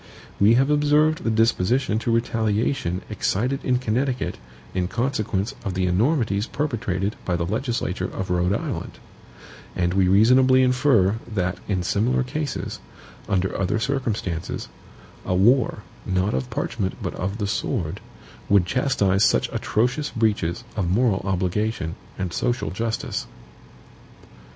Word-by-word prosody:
We 105 +3 +6
have 135 +4 +3
observed 150 +2 +3
the - - 0
disposition 115 +1 +2
to 115 - -1
retaliation 110 -4 0
excited 115 +5 -1
in 125 -1 +2
Connecticut 125 +2 -1 0.3
in 90 -1 0
consequence 110 -2 -1
of 95 -4 -3
the 95 0 +1
enormities 110 - +1
perpetrated 105 -8 -2
by 90 - -1
the 85 -1 -1
Legislature 105 -3 -2
of 95 -1 -4
Rhode 90 +1 +2
Island; - - -4 0.8
and 90 0 +1
we 95 -1 +3
reasonably 130 +7 +5
infer 125 -6 +3
that, 90 -3 -1
in 95 -3 0
similar 115 +8 +1
cases, 145 +3 -4 0.5
under 95 -2 0
other 95 +2 0
circumstances, 110 - -2 0.5
a 90 - -1
war, 110 +2 +3 0.2
not 95 0 0
of 65 -1 -2
PARCHMENT, 95 +7 -2
but - - -3
of 100 +3 -3
the 105 - -2
sword, 100 - -2 0.5
would 100 -3 +5
chastise 100 -4 +2
such - - +3
atrocious 125 +7 0
breaches 105 -4 0
of 95 -5 -1
moral 105 0 +2
obligation 95 -1 -1 0.2
and 95 -3 -3
social 125 0 -1
justice. 110 +4 -3
105 Hz, 130 wpm, -23 LUFS, 95-125 Hz, 0.8 s, We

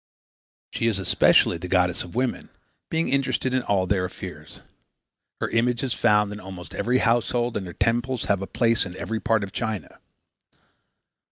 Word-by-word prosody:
She 115 - -1
is 110 -4 +1
especially 95 -2 +4
the 90 - -6
goddess 90 -1 +2
of 85 - -12
women, 125 0 -1 0.4
being 165 +1 0
interested 135 -1 0
in 130 - +2
all 100 -5 +1
their 95 0 +1
affairs. 90 -4 -9 0.8
Her - - -1
image 120 +1 +1
is 130 - -1
found 105 -1 +3
in 105 - -7
almost 90 -3 -9
every 125 +2 +1
household 120 0 +1
and 95 - -3
her 85 - -8
temples 120 +4 0
have 100 -2 +1
a 95 - -4
place 115 -2 +2
in 90 -1 -7
every 110 0 -3
part 110 -2 +1
of 100 - -6
China. 110 -2 -4
105 Hz, 170 wpm, -24 LUFS, 95-120 Hz, 0.8 s, especially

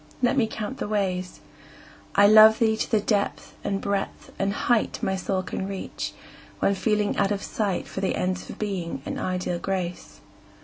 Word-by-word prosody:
Let 245 - +4
me 245 -5 +3
count 220 +4 -5
the - - -2
ways. 185 -3 -2 0.7
I 200 - +7
love 215 +1 +9
thee 220 -1 +3
to 220 - -2
the 220 - +3
depth 205 -1 -1
and 195 -1 -1
breadth 200 -1 -3
and 195 0 +1
height 230 +2 +1
My 190 - +1
soul 190 0 -1
can 190 +1 -4
reach, 195 -1 -5 0.4
when 200 - +2
feeling 210 +1 +1
out 200 -1 +3
of 200 -1 -1
sight 200 -5 -2
For 190 - -5
the 195 - 0
ends 185 0 -2
of - - -7
Being 180 -9 -3
and - - -4
ideal 180 -1 -2
Grace. 180 -2 -4
200 Hz, 180 wpm, -25 LUFS, 185-215 Hz, 0.7 s, love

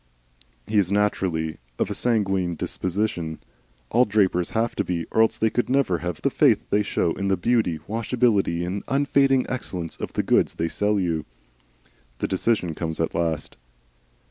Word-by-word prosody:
He 105 -1 +2
is 95 -1 +1
naturally 95 -6 0 0.2
of - - -1
a - - 0
sanguine 95 -7 0
disposition. 85 -2 -2 0.5
All 125 +2 +5
drapers 95 -5 +1
have 115 +1 -1
to - - +1
be, 85 -2 -2
or 110 - +3
else 110 - +3
they 110 -1 +1
could 120 - 0
never 130 -10 +2
have 90 +1 -5
the - - +2
faith - - +3
they 105 - +3
show 95 -4 0
in 100 - -3
the 95 -1 +2
beauty, 105 -4 +1
washability, 110 -6 +1
and 95 +3 -3
unfading 135 -1 +3
excellence 90 -10 -4
of - - -6
the - - 0
goods - - +2
they 80 0 -1
sell 105 +2 +1
you. 85 -4 -1 0.9
The - - -1
decision 95 -3 0
comes 80 0 -3
at 80 - 0
last. 80 -3 -2
95 Hz, 170 wpm, -24 LUFS, 85-110 Hz, 0.9 s, All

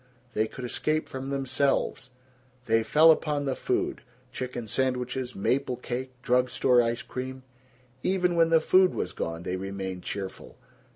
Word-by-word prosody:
They 110 +1 +1
could 125 +2 -7
escape 155 +5 -1
from 135 +1 -6
themselves. 135 -2 0 0.6
They 115 0 +3
fell 155 +8 +6
upon 150 -2 0
the 135 -2 0
food 370 -1 -1 0.3
chicken 125 -3 -5
sandwiches, 125 +1 -1
maple 130 +5 0
cake, 125 +1 -4
drug 125 +1 +3
store 125 -1 +4
ice 115 0 -1
cream. 130 +1 -6 0.6
Even 180 0 +1
when 165 -1 +4
the 165 -1 +6
food 185 +3 +4
was 90 - -3
gone 85 +1 -4
they 90 +1 -2
remained 95 -1 -5
cheerful. 95 0 -6
130 Hz, 150 wpm, -27 LUFS, 115-145 Hz, 0.6 s, fell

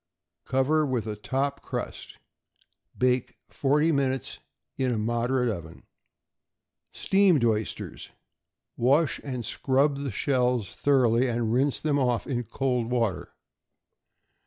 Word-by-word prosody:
Cover 140 +4 +2
with 130 -6 -1
a 105 -1 -4
top 135 +6 -2
crust; - - -6 0.8
bake 125 -1 +1
forty 150 +3 +2
minutes 135 -3 -1 0.4
in 130 -2 0
a 115 - 0
moderate 120 +3 0
oven. 85 -7 -5 1.1
=Steamed 190 -10 +3
Oysters.= 110 -1 -2 0.7
Wash 140 +6 +2
and 125 -5 -4
scrub 140 +5 +1
the 140 0 -3
shells 125 -2 0
thoroughly, 130 -3 +3
and 115 -2 -1
rinse 135 +3 +1
them 145 -2 0
off 125 -3 +1
in 125 -3 -2
cold 125 0 -1
water. 115 -6 -1
130 Hz, 110 wpm, -27 LUFS, 120-140 Hz, 1.1 s, =Steamed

